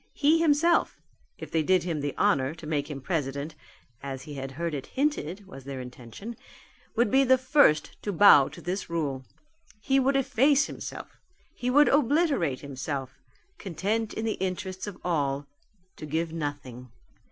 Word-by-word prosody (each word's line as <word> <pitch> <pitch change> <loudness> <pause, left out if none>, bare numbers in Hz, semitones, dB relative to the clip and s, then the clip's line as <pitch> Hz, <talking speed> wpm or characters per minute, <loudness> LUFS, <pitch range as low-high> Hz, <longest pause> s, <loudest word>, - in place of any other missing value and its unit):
He 305 +3 +3
himself 330 +1 +3 0.4
if - - -9
they 160 - +2
did 185 +4 +2
him 165 -4 -2
the 145 0 -3
honour 135 +3 +2
to 165 - -11
make 150 -1 -2
him 140 -2 -6
president 140 -1 -3 0.5
as 135 -1 -6
he 150 - -9
had 135 -1 -6
heard 170 +3 -3
it 135 -2 -5
hinted 210 - -2
was 135 -8 -11
their 135 0 -6
intention 125 - -9 0.6
would 235 -2 +2
be 270 +1 +5
the 260 0 +5
first 260 - +3
to 205 - -3
bow 165 -7 +7
to - - -11
this 185 +3 -4
rule. 145 -6 -2 0.6
He 270 +6 +2
would 270 +1 +2
efface 275 +2 +3
himself. - - -8 0.3
He 250 - -3
would 290 +3 +6
obliterate 280 - +2
himself, 135 -1 -5 0.4
content 205 +5 -2
in 220 - -3
the 220 - -2
interests 185 +1 -3
of 200 -3 -7
all, 145 -5 0 0.5
to 155 - -7
give 160 +2 -2
nothing. 145 -5 -5
170 Hz, 165 wpm, -27 LUFS, -, 0.6 s, bow